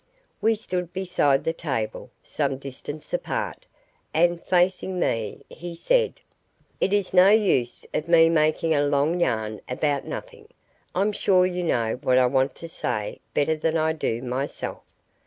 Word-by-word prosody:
We 225 0 +3
stood 180 -4 -4
beside 175 -7 +1
the 165 - 0
table, 125 -7 -3
some 140 -3 -1
distance 140 +3 -8
apart, - - -3 0.5
and, 170 +1 +3
facing 185 0 +1
me, 115 - -1
he 170 +1 -8
said: 480 - +2 0.6
"It - - +1
is 205 -3 0
no 185 +1 +7
use 195 - +2
of 155 - -2
me 165 -1 +6
making 160 0 +2
a 145 -1 +2
long 145 +4 +1
yarn 110 -8 -1
about 140 +2 0
nothing. 475 -3 -8 0.5
I'm 200 +3 +2
sure 185 -3 +3
you 180 -1 -2
know 120 -8 0
what 130 0 +3
I 130 - +5
want 130 +2 +1
to 165 - -8
say 105 -9 -3 0.2
better 160 +2 +2
than 160 +1 0
I 160 0 +1
do 120 -6 -2
myself. 130 +3 -4
160 Hz, 155 wpm, -25 LUFS, 135-180 Hz, 0.6 s, no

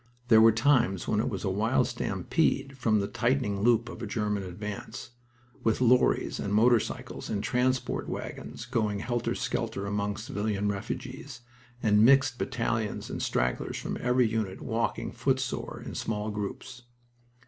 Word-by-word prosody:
There 110 -2 +8
were 115 0 +8
times 110 -5 +2
when - - +1
it - - 0
was - - -4
a - - 0
wild - - +2
stampede 135 0 -1
from 115 -4 +2
the 100 - -1
tightening 115 -5 0
loop 120 +1 +3
of 120 - -8
a 115 - -4
German 105 -1 -1
advance, 105 +5 -7 0.5
with 110 -1 +2
lorries 125 0 +3
and 100 - -3
motor 115 +3 +5
cycles - - -6
and 100 -1 -2
transport 130 +1 0
wagons 70 - -6
going 110 -4 0
helter 120 0 -1
skelter 100 - -2
among 100 0 -1
civilian 105 -4 -2
refugees 130 +6 -5 0.4
and 105 -1 +5
mixed 130 0 +5
battalions 115 -3 -2
and - - -4
stragglers 60 +1 -1
from - - -4
every 125 0 +3
unit 110 -4 -2
walking, 115 0 -2
footsore, - - -2
in - - -6
small 105 -1 -2
groups. 105 +5 -6
110 Hz, 150 wpm, -28 LUFS, 105-125 Hz, 0.5 s, There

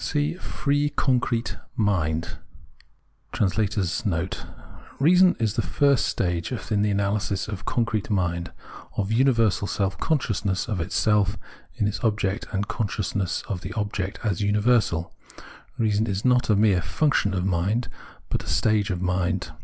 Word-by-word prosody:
c 150 +1 0
[FREE 145 -4 -1
CONCRETE 125 -3 0 0.2
MIND*] 85 -7 0 1.0
(AA) - - +4
REASON 95 -3 0
t - - -3 0.6
[Reason 180 +5 +5
is 110 -3 +1
the 115 - 0
first 140 +8 +2
stage 85 +1 -1 0.2
in 105 -1 +2
the 105 - +2
analysis 100 0 0
of 100 -1 -6
concrete 115 -3 -1
mind 85 -4 -1 0.2
— - - -16
of 100 0 -1
universal 115 -5 +3
self 95 -1 -1
conscious 105 - 0
of 105 -6 -2
itself 100 +2 +1 0.4
in 105 - +1
its 105 - -4
object 105 -1 0
and 100 +1 -1
conscious 105 -3 -2 0.3
of 90 -4 -4
the - - -6
object 105 -2 -3
as 105 -5 -1
universal. 105 -4 +2 0.7
Keason 110 -1 +2
is 100 +2 -2
not 125 -2 +3
a 105 - +5
mere 100 -3 +3
'function' 100 - +1
of 90 0 -1
mind, 95 +6 0 0.4
but - - -2
a - - -13
stage 110 -1 +2
of 90 -1 -2
mind. 90 -1 -1
105 Hz, 145 wpm, -25 LUFS, 95-115 Hz, 1.0 s, Reason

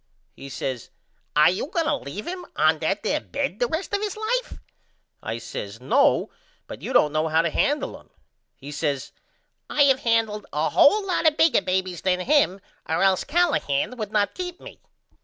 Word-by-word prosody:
He 140 - -10
says 130 -3 -5 0.5
Are 150 +3 +6
you 190 +8 -3
going 335 0 -1
to 305 - +1
leave 205 - -7
him 360 0 -5
on 155 +1 +3
that 195 +6 -1
there 300 - 0
bed 275 -10 -3
the 245 - +2
rest 325 +9 -4
of 405 - +1
his 425 -1 -3
life? 485 +3 -2 0.6
I 115 - -4
says 105 -1 -7
No 130 +2 +2 0.3
but - - -9
you - - -5
don't 150 - +4
know 155 +1 +1
how 160 +1 +2
to 170 - -1
handle 295 - 0
him. - - -23 0.5
He 140 +2 -10
says 145 -2 -2 0.6
I 290 - +3
have 270 -2 +4
handled 225 -4 0
a 150 +2 0
hole 415 +7 +5
lot 325 -5 +2
bigger 320 -6 +4
babys 185 -1 -2
than 185 -1 +1
him 235 -6 +2 0.3
or 160 - +1
else 190 -1 +3
Callahan 255 - +1
would 215 -3 -5
not 205 -1 +1
keep 360 -1 -6
me. - - -12
210 Hz, 185 wpm, -24 LUFS, -, 0.6 s, Are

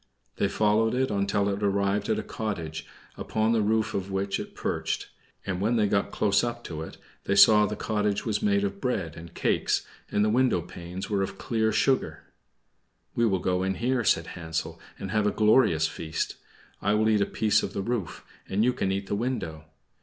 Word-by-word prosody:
They - - +2
followed 110 +2 +2
it 130 -1 +1
until 100 0 +1
it 100 0 -2
arrived 100 0 +1
at 110 - +2
a - - -3
cottage, 80 -8 -4 0.3
upon 110 +1 0
the 115 -1 +3
roof 110 +1 +1
of 95 0 -3
which 95 0 -1
it - - -8
perched; - - -2 0.4
and 95 -1 -2
when 110 +4 +2
they 110 -2 +3
went 100 0 +1
close 105 +1 +2
up 120 0 -3
to 80 -2 -6
it 80 - -8 0.3
they 100 - +1
saw 105 +1 +7
that 105 - -4
the - - -8
cottage 105 -1 0
was 110 -2 0
made 100 -1 +2
of 100 0 -3
bread 95 - -2
and 85 0 -11
cakes, - - +1 0.2
and 105 - +2
the - - +2
window 125 -3 +3
panes 90 +2 -7
were 100 -2 0
of 95 0 -3
clear 110 0 0
sugar. 130 +5 +1 0.9
"We 120 0 +2
will 95 -3 +2
go 90 0 0
in 95 +1 0
there," 120 +4 0
said 85 -5 +2
Hansel, 80 -2 -4 0.2
"and 95 - -6
have 105 -1 +2
a - - +2
glorious 105 -8 +4
feast. 80 0 -4 0.5
I 100 +2 +2
will 110 +1 +2
eat 110 -2 +3
a - - +2
piece 105 -1 +2
of 100 - -4
the 100 - -2
roof, 115 -5 -3 0.2
and 100 +3 +1
you 125 +1 +3
can 95 -6 -1
eat 100 +1 -2
the - - -4
window. 100 -9 -3
100 Hz, 205 wpm, -27 LUFS, 95-110 Hz, 0.9 s, saw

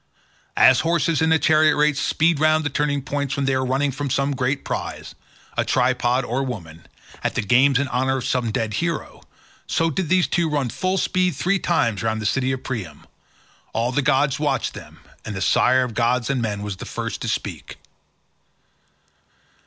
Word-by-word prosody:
As - - +6
horses 165 -1 +1
in 160 0 +2
a 160 - +5
chariot 155 0 +4
race 150 -1 +2
speed 165 +3 +1
round 155 0 +3
the 145 - -2
turning 145 -2 -1
posts 140 0 -2
when 140 -2 -1
they 135 - +1
are 130 0 0
running 135 +2 0
for 140 +1 -4
some 140 +2 0
great 130 +2 -1
prize—a - - -6
tripod 125 0 +1
or 125 +3 -1
woman—at 85 -12 -7
the - - 0
games 130 +6 +4
in 140 +1 0
honour 130 +2 0
of 125 - -4
some 125 -3 0
dead 110 0 -2
hero, 170 -3 -4 0.5
so 165 0 +1
did 165 +2 -2
these 185 -1 +3
two 170 -2 0
run 145 -4 -1
full 185 - -1
speed 185 -1 +1
three 195 +2 0
times 115 - 0
round 110 -1 -1
the 110 - -5
city 130 +4 +1
of 130 -1 -4
Priam. 110 -10 -6 0.7
All 115 +2 0
the 145 - +1
gods 140 +1 +2
watched 150 -1 -1
them, - - -12 0.2
and 105 - -6
the - - -3
sire 130 +7 +3
of 125 -2 -5
gods 125 +2 +1
and 130 -3 -1
men 105 -3 -3
was 100 -2 -5
the - - -8
first - - -5
to - - -3
speak. - - -4
135 Hz, 185 wpm, -22 LUFS, 125-150 Hz, 0.7 s, As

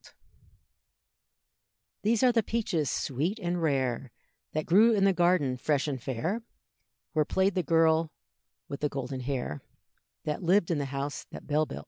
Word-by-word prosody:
These 225 +3 +2
are 255 - +6
the 230 -1 +3
peaches 200 - -1
sweet 155 - -1
and 175 -4 -2
rare, 130 -4 0 0.4
That 155 0 -1
grew 215 +7 +5
in 200 -2 +2
the 195 -1 +5
garden 175 -7 +2
fresh 145 +3 0
and 135 -4 -3
fair, 160 - -2 0.7
Where 155 -2 +3
played 190 +5 +1
the 185 - +1
girl 165 -1 +3 0.6
with 140 - -6
the 150 - 0
golden 135 -1 -4
hair, 125 - -3 0.6
That 150 - -3
lived 180 0 +3
in 160 - +1
the 140 - -1
house 140 +1 -4
that - - -10
Bell 150 +1 +1
built. - - -6
160 Hz, 155 wpm, -29 LUFS, 140-185 Hz, 0.7 s, are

